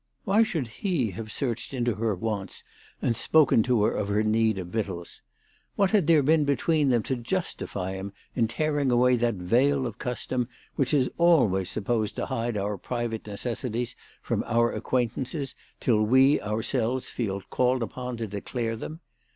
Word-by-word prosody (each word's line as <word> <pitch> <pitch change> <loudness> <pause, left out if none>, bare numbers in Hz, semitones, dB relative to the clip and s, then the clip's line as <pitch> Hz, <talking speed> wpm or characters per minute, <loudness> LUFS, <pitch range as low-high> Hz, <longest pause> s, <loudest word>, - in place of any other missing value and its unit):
"Why 205 +2 +3
should 165 - 0
he 130 - -1
have 110 +4 -6
searched 125 +1 -3
into 120 -2 +1
her 110 0 -1
wants 100 -1 -4 0.4
and 115 - +2
spoken 150 -5 +4
to 120 -2 +2
her - - +3
of 100 - -2
her 105 +1 +1
need 110 -1 +2
of 90 -2 -5
victuals? 95 -5 -4 0.5
What 195 -2 +2
had 200 -8 +3
there 160 -4 +5
been 155 +2 +4
between 145 +1 +2
them 120 -3 +2
to 130 - -1
justify 120 - -3
him 95 +1 -5 0.2
in 115 -3 +2
tearing 145 +3 0
away 125 +1 +4
that 120 -1 +1
veil 130 +9 +2
of 115 -3 -6
custom 125 0 -2 0.3
which 135 - +1
is 135 -4 +2
always 120 - +4
supposed 110 0 -1
to - - -2
hide 115 -1 -2
our 100 0 -2
private 120 -1 -3
necessities 120 +3 -2 0.3
from - - -1
our 120 0 +2
acquaintances 130 +3 -1 0.3
till 110 -4 +2
we 130 +6 +5
ourselves 115 +4 -1
feel 100 -5 -2
called 125 -1 +2
upon 125 +1 -5
to 115 - -3
declare 115 +3 -3
them 155 +9 -7
120 Hz, 165 wpm, -27 LUFS, 110-135 Hz, 0.5 s, there